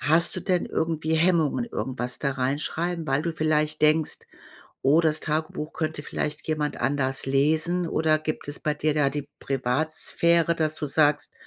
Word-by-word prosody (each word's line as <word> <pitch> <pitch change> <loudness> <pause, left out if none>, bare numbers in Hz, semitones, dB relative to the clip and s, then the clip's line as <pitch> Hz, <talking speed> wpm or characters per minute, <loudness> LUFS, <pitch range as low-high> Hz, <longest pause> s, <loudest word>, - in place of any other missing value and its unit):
hast 160 +3 +2
du - - -2
denn 180 -3 0
irgendwie 160 -1 -1
Hemmungen 165 - +2
irgendwas 125 - -4
da 140 -2 0
reinschreiben, 155 +6 -2
weil 135 +3 +1
du 170 -1 -2
vielleicht 155 -1 0
denkst: 155 0 +3 0.6
„Oh, 145 +5 +5
das 155 -2 +1
Tagebuch 155 0 -3
könnte 155 -2 -3
vielleicht 150 +1 -4
jemand 150 -1 -1
anders 135 -2 -1
lesen“, 160 +6 +1
oder 155 -1 +2
gibt 155 -1 -4
es 145 - -5
bei 150 -1 0
dir 150 0 0
da 140 -2 +2
die 145 0 -5
Privatsphäre, 155 +5 +1
dass 155 -1 0
du 150 - -3
sagst: 145 +1 +2
155 Hz, 160 wpm, -25 LUFS, 145-160 Hz, 0.6 s, Oh